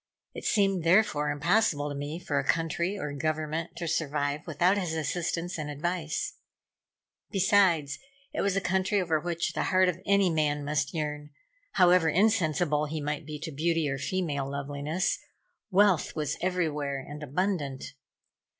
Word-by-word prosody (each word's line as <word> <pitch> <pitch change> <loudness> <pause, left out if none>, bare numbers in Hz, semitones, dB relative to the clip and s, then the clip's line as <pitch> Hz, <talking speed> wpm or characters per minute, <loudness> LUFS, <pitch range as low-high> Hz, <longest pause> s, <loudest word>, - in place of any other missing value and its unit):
It - - -8
seemed, 195 -4 +2
therefore, 170 -4 +3
impossible 155 -1 +2
to - - -4
me 145 +3 -4
for 145 -5 -1
a - - -1
country 165 +6 0
or 150 -6 -4
government 155 +2 -2
to 170 - -4
survive 150 -1 -1
without 175 +5 +3
his 180 -5 -2
assistance 170 +2 -2
and 150 -1 -4
advice. 160 +2 -3 0.9
Besides, 185 -7 +3 0.3
it - - -1
was 195 -1 +1
a 195 - +1
country 190 +2 +1
over 165 -4 +1
which 170 0 -2
the - - -1
heart 185 0 +4
of 180 0 -4
any 200 -2 +4
man 150 -2 0
must 145 -1 0
yearn, 150 -1 -3 0.4
however 180 -3 +5
insensible 165 -6 +2
he 155 +1 -3
might 150 +1 -3
be 155 -1 -5
to 160 - -5
beauty 165 +2 0
or 135 -1 -2
female 145 -5 -2
loveliness. 145 +5 -2 0.5
Wealth 195 -3 +3
was 150 -2 -1
everywhere 155 -6 -1
and 150 +1 -8
abundant. 150 -3 -2
160 Hz, 150 wpm, -28 LUFS, 150-180 Hz, 0.9 s, however